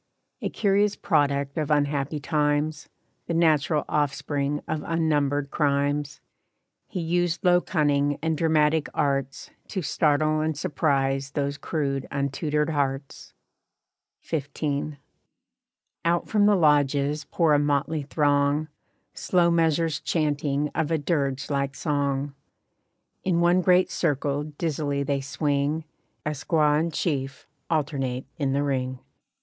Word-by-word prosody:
A - - -1
curious 205 0 +2
product 140 -4 0
of 150 - -2
unhappy 145 0 0
times, 150 0 0 0.4
The 170 - -1
natural 155 -2 +2
offspring 145 0 -1
of 155 -1 -2
unnumbered 145 -4 0
crimes, 145 -1 0 0.7
He 185 - -5
used 175 +2 0
low 180 0 +5
cunning 145 -4 +1
and 160 0 0
dramatic 155 -1 +2
arts 135 -1 -1 0.2
To 190 -4 -3
startle 155 +1 +2
and 155 -1 -1
surprise 140 -4 0
those 140 +1 -2
crude 140 -3 -2
untutored 150 +2 -1
hearts. 140 -2 -3 0.9
XV. 145 -1 -2 1.1
Out 170 0 +1
from 205 -1 +3
the 210 - +5
lodges 145 -2 +2
pour 165 -3 +2
a 145 - +4
motley 145 +1 0
throng, 145 +1 +1 0.4
Slow 175 -2 +2
measures 165 -1 +2
chanting 150 -2 0
of 160 -2 -1
a 165 - +2
dirge 140 -3 -1
like 140 -1 -1
song. 140 -2 -1 0.9
In 180 -2 +1
one 175 +2 +4
great 180 0 +3
circle 145 -2 0
dizzily 145 -2 -2
they 140 0 -1
swing, 145 +2 -1 0.4
A 150 - 0
squaw 150 0 +2
and 165 +1 -1
chief 135 -5 -2 0.2
alternate 140 -5 -1
in 135 -2 0
the 140 +1 +1
ring. 130 -2 -1
150 Hz, 120 wpm, -25 LUFS, 140-160 Hz, 1.1 s, low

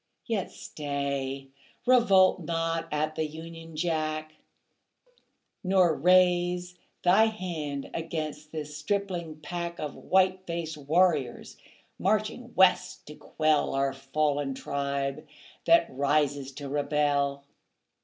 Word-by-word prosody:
Yet 220 -5 -2
stay. 140 -2 -4 0.4
Revolt 200 -8 +5
not 165 0 -1
at 155 +1 -1
the 155 0 -1
Union 165 +1 -10
Jack, 155 -1 -2 1.3
Nor 185 -3 +3
raise 180 +2 +3 0.3
Thy 190 +5 +6
hand 165 -10 -4
against 155 -2 -4
this 150 -2 -6
stripling 170 -1 -3
pack 170 +1 -4
Of 150 -2 -4
white 185 0 +1
faced 170 -2 -3
warriors, 150 -3 +1 0.4
marching 215 +5 -1
West 185 -1 +3
to 150 - -10
quell 155 -3 0
Our 135 0 +1
fallen 140 0 -1
tribe 140 0 -3 0.4
that 335 0 +6
rises 140 0 +1
to 140 +1 -7
rebel. 145 -1 0
155 Hz, 105 wpm, -28 LUFS, 145-180 Hz, 1.3 s, Thy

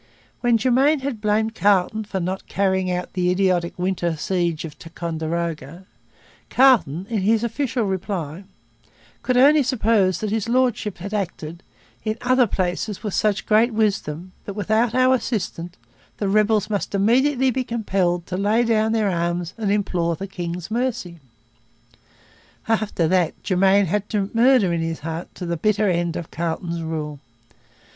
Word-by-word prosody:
When 240 -1 +3
Germain 265 +5 +3
had 260 -5 -4
blamed 215 +1 +1
Carleton 205 +1 +2
for 195 -2 -3
not 185 +2 -4
carrying 190 -1 0
out 180 0 -3
the 180 -1 +1
idiotic 180 -2 +1
winter 175 -2 -1
siege 170 -2 -1
of 155 -2 -9
Ticonderoga, 165 0 -4 0.6
Carleton, 200 - +4
in 225 -2 -1
his 220 +3 +2
official 240 +1 -1
reply, 190 -3 -3 0.8
'could 250 -1 0
only 290 +4 +6
suppose' 220 - +2
that 215 -2 -2
His 225 +1 -1
Lordship 240 -5 +1
had 200 +4 -7
acted 170 -4 -4 0.4
'in 220 0 -2
other 255 0 +3
places 185 +3 -2
with 210 -3 -3
such 215 -1 +1
great 225 +2 +3
wisdom 185 -5 -1
that, 200 - -6
without 220 +3 +1
our 255 0 +4
assistance, 185 -8 -3 0.4
the 205 - -1
rebels 210 +1 +2
must 205 -1 -2
immediately 260 +6 +3
be 255 +1 -1
compelled 190 -7 -1
to 180 - -4
lay 210 +4 +2
down 220 -1 +2
their 215 -3 +1
arms 175 0 -2
and 215 -3 -1
implore 180 -5 0
the 195 - -6
King's 175 -1 -6
mercy.' 220 -8 -2 1.5
After 215 -7 0
that 180 -1 0
Germain 195 +1 +3
had 205 +4 -2 0.2
murder 230 -6 +4
in 165 - -1
his 165 0 -3
heart 165 +3 -6
to 180 - -6
the 170 0 -2
bitter 210 +4 +1
end 170 -2 0
of 170 - -6
Carleton's 170 0 -3
rule. 155 -3 -4
195 Hz, 150 wpm, -22 LUFS, 175-225 Hz, 1.5 s, only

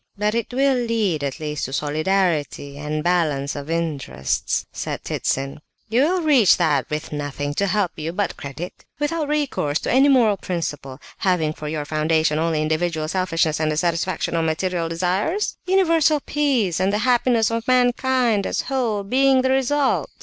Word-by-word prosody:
"But 210 +1 0
it 235 +1 -2
will 270 +1 +2
lead 220 -10 0
at 140 +2 -3
least 150 -1 -3
to 135 - -7
solidarity, 155 -1 -1
and 150 +1 -3
balance 155 -6 0
of 145 +1 -7
interests," 145 - -2
said - - -5
Ptitsin. 135 +1 -2 0.3
"You 235 +4 +3
will 350 +5 +2
reach 265 - +5
that 150 -7 +1
with 150 +1 -4
nothing 145 -1 -3
to 200 +7 0
help 190 -1 +1
you 155 +2 -3
but 200 +4 -2
credit? 145 +6 -8
Without 300 +1 -1
recourse 285 - 0
to - - -2
any 270 +3 +5
moral 230 -7 +4
principle, 150 -7 -4 0.2
having 170 -5 +1
for 155 - -7
your 150 -1 -3
foundation 155 0 +1
only 160 -1 0
individual 155 0 -1
selfishness, 165 -3 0
and 155 -1 +1
the 150 - -2
satisfaction 170 +1 -1
of 165 - +1
material 165 +1 -1
desires? 185 - -1
Universal 330 -5 +3
peace, 260 - 0
and 190 +1 +2
the 205 - +1
happiness 240 -2 +3
of 230 +1 -3
mankind 250 -3 +2
as - - -1
a - - -16
whole, 225 -6 0
being 260 +4 +3
the 260 - +2
result! 270 +1 +1
180 Hz, 170 wpm, -22 LUFS, 155-245 Hz, 0.3 s, reach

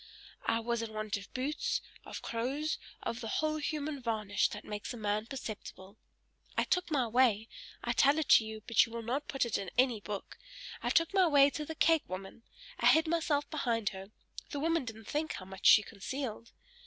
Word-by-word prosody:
I 225 - +2
was 235 0 -1
in 225 -1 -5
want 215 -1 -2
of 200 0 -11
boots, 275 +4 -1 0.3
of - - -7
clothes, 270 +7 -2 0.2
of 230 - -3
the 225 - -4
whole 310 +7 0
human 300 -1 -3
varnish 215 -4 +1
that 210 - -8
makes 210 -1 -5
a - - -8
man 210 0 -1
perceptible. 210 -6 -7 0.6
I - - +4
took 360 -1 0
my 270 -6 +1
way 225 -2 +3 0.4
I - - 0
tell 280 +2 +4
it 315 - 0
to - - +8
you, 220 -1 -7
but 230 -2 +5
you 230 - -6
will 230 0 -5
not 265 +6 -2
put 270 -3 0
it 235 - -1
in 195 - -5
any 245 -4 +3
book 205 -1 -6 0.4
I - - -1
took 330 +3 +3
my 380 -2 +5
way 285 -2 +6
to 300 - -4
the 320 - -6
cake 325 0 +3
woman 195 +4 -7 0.4
I - - +4
hid 320 +1 +6
myself 315 -3 +1
behind 235 -8 0
her; 190 0 -9 0.4
the 285 - -4
woman 330 -1 +1
didn't 225 -2 -8
think 310 +6 -2
how 185 - -7
much 190 +1 -1
she 210 - +8
concealed. 230 +2 -5
235 Hz, 205 wpm, -32 LUFS, 215-295 Hz, 0.6 s, to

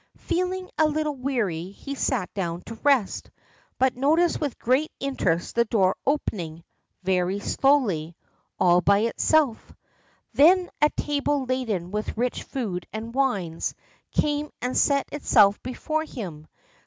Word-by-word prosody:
Feeling 365 +1 -2
a 315 - +5
little 305 -1 -1
weary, 220 -11 -2
he 275 +7 -7
sat 255 -8 -1
down 175 -3 -3
to 230 - -8
rest, 275 -8 +1 0.5
but 260 0 +2
noticed 320 +8 +2
with 285 -5 -2
great 260 +6 +1
interest 190 -12 -1
the 235 0 +3
door 195 -4 +2
opening 175 - -2 0.4
very 185 +1 +1
slowly, 205 - +1 0.4
all 175 0 +5
by 200 +2 +4
itself. 250 +2 +1 0.6
Then 355 +5 +5
a 300 - +6
table 290 -1 0
laden 225 -9 -2
with 210 +1 -3
rich 245 +1 -1
food 190 -10 -4
and 225 +2 -6
wines 200 -12 -1 0.4
came 295 0 0
and 250 +1 -3
set 280 -1 +3
itself 205 -8 +4
before 310 +5 -3
him. 170 - -8
250 Hz, 130 wpm, -25 LUFS, 190-290 Hz, 0.6 s, a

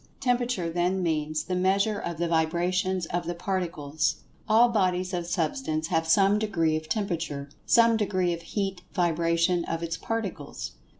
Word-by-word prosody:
Temperature 245 -7 0
then 175 +3 0
means 155 -2 -1
"the 180 - -4
measure 195 +3 +2
of 170 -2 -4
the 170 +1 0
vibrations 175 +3 +1
of 170 +1 -3
the 175 - -2
Particles." 160 -5 -2 0.3
All 225 +3 +6
bodies 185 -4 0
of 175 -1 -2
Substance 160 - -1
have 165 0 +1
some 195 +4 +4
degree 170 -7 +1
of 155 0 -5
Temperature—some 175 - +1
degree 185 -4 +1
of 170 - -6
heat 195 -1 -3
vibration 170 0 +2
of 165 0 -3
its 165 -1 -3
Particles. 200 -10 -4
175 Hz, 145 wpm, -27 LUFS, 165-195 Hz, 0.3 s, All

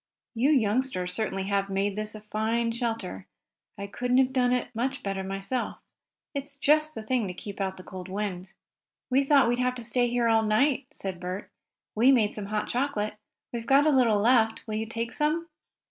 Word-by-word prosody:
"You 245 +4 +2
youngsters 225 -7 +1
certainly 195 -2 -1
have 200 0 0
made 195 +1 0
this 215 0 -4
a 215 - -8
fine 220 +2 -1
shelter. 225 - -3 0.5
I 200 - -5
couldn't 245 +5 0
have 260 0 +3
done 250 -2 +3
it 250 0 -1
much 255 +4 -2
better 195 -1 -2
myself. 195 +6 -3 0.6
It's 280 0 -5
just 305 +2 +2
the 220 - -5
thing 235 -1 0
to 180 - -6
keep 200 +2 -7
out 190 -1 -2
the 185 - -10
cold 185 0 -8
wind." 190 -2 -4 0.6
"We 270 +2 +4
thought 275 -2 +5
we'd 240 +1 +1
have 250 0 +1
to 245 - -7
stay 245 +2 +1
here 240 0 +1
all 225 -1 +4
night," 255 +5 +2
said 190 -11 -6
Bert. 185 +3 -5 0.4
"We 240 +5 +5
made 220 -6 +3
some 205 -2 -5
hot 210 0 -2
chocolate. 240 -5 -1 0.4
We've 230 -1 -4
got 280 +2 +5
a 310 - +5
little 240 -6 +4
left. 225 0 +3
Will 215 - -5
you 220 +1 -2
take 230 +1 -3
some?" 320 +3 0
225 Hz, 195 wpm, -27 LUFS, 200-255 Hz, 0.6 s, thought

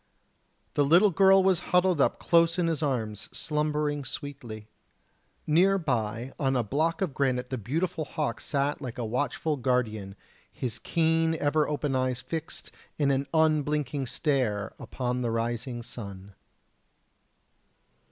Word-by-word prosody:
The 145 - +3
little 175 +8 +5
girl 195 +2 +6
was 190 -3 +3
huddled 180 -3 +3
up - - +2
close 170 0 +3
in 175 - +2
his 165 -2 0
arms 115 -8 -2
slumbering 150 -1 -1
sweetly. 120 -7 -7 0.8
Near 185 +6 +4
by 120 - -2
on 135 -2 +1
a 125 - +2
block 155 - 0
of 165 -8 -2
granite 130 -2 0
the 130 -2 -3
beautiful 160 - -2
hawk 145 -6 -3
sat 140 0 -1
like 125 -1 -6
a 120 - -2
watchful 130 +6 -1
guardian 110 -6 -1 0.4
his 120 -3 -4
keen 165 +1 +1
ever 150 0 +1
open 145 -2 -1
eyes 130 -1 0
fixed 160 +5 -5 0.3
in 145 -2 +2
an 135 +1 0
unblinking 150 -3 +1
stare 115 -8 0
upon 125 -1 -3
the 120 - 0
rising 120 +1 -2
sun. 100 -5 -9
140 Hz, 135 wpm, -28 LUFS, 120-160 Hz, 0.8 s, girl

